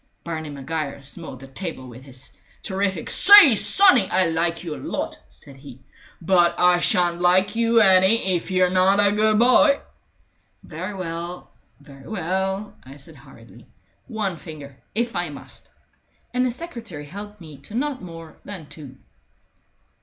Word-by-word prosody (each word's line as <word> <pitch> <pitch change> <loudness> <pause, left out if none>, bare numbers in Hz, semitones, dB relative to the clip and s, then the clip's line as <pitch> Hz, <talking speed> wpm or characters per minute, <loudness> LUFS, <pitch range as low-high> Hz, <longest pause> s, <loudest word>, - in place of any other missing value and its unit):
Barney 160 -2 -6
Maguire 145 +1 -6
smote 140 -2 -8
the 135 - -12
table 135 -1 -7
with 130 +1 -13 0.3
terrific 190 -3 -3
fist. - - +2
"Say, 405 - +10
sonny, 370 - +6
I 185 +1 +1
like 165 +1 -2
you 160 -4 -6
a - - -10
lot," - - -5
said 135 -1 -12
he. 135 -2 -14 0.4
"But 175 -1 +2
I 180 0 +3
shan't 175 -1 0
like 185 +4 +2
you 230 0 +2
any 190 0 +3
if 175 - -5
you're 185 -1 +1
not 190 +2 +2
a 205 0 +3
good 215 +1 +1
boy!" 255 +4 +4 0.8
"Very 185 +6 -8
well, 175 -1 -7 0.3
very 140 -2 -16
well," 190 +1 -4
I 135 +2 -14
said 140 - -12
hurriedly. - - -18 0.4
"One 215 -7 -4
finger, 150 -4 -12 0.2
if 235 +1 -2
I 175 -2 -3
must." 145 - -13 0.6
And 250 +1 0
the - - -1
secretary 235 - -9
helped 205 +6 -10
me 155 -5 -13
to 205 +10 -12
not 280 +1 -3
more 165 -3 -12
than 185 -7 -10
two. 145 -3 -12
180 Hz, 155 wpm, -21 LUFS, 155-205 Hz, 0.8 s, Say